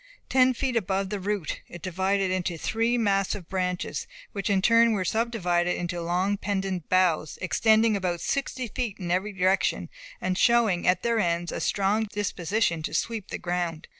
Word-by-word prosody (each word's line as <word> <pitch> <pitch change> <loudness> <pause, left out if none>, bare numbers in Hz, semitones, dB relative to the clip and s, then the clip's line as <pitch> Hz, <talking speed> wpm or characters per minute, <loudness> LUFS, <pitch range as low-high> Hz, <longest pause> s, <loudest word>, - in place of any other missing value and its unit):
Ten 255 -1 +4
feet 260 0 -1
above 195 -2 0
the 205 - -2
root, 200 -3 -3
it 175 - -11
divided 190 +1 0
into 180 -2 -1
three 230 +7 0
massive 195 -4 0
branches, 180 -1 -2 0.2
which 200 +1 -3
in 200 -1 +3
turn 230 +3 +5
were 190 -3 -1
subdivided 180 -5 0
into 175 0 -3
long 180 +4 0
pendant 195 -4 -3
boughs 180 -4 +2
extending 220 +3 +3
about 180 -3 -1
sixty 260 +2 -2
feet 230 -2 -3
in 175 -2 -4
every 190 +4 0
direction, 190 0 +1 0.3
and 185 +1 -1
showing, 230 -7 +3
at 180 - +3
their 235 -1 +1
ends, 170 -2 0
a - - -4
strong 205 +3 +1
disposition 200 -3 -1
to 155 - -4
sweep 225 -4 -2
the - - -4
ground. 175 -2 -3
195 Hz, 165 wpm, -26 LUFS, 180-220 Hz, 0.3 s, turn